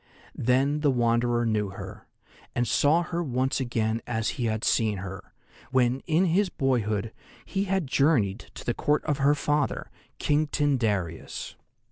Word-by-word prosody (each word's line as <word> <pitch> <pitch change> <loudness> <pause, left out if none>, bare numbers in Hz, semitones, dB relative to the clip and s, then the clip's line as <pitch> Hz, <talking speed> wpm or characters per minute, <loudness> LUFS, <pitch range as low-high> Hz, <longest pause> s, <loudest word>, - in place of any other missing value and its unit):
Then 135 +5 +1
the 150 -1 +2
Wanderer 120 -1 +2
knew 105 -3 0
her, 95 - -9 0.5
and 120 0 +1
saw 160 +4 +3
her 170 0 -3
once 130 -3 0
again 115 -3 -1
as 115 -2 -1
he 125 - -3
had 110 -1 -1
seen 110 -3 +2
her, 95 0 -8 0.4
when 130 0 +2
in 170 +3 +3
his 185 +3 +2
boyhood 115 - 0 0.3
he 195 0 -1
had 190 -3 0
journeyed 130 -8 +2
to - - -9
the 120 - +1
Court 150 +5 0
of 150 -2 0
her 140 +2 +4
father, 145 -1 -1 0.3
King 150 +1 +1
Tyndareus. 110 - -1
125 Hz, 150 wpm, -27 LUFS, 110-145 Hz, 0.5 s, her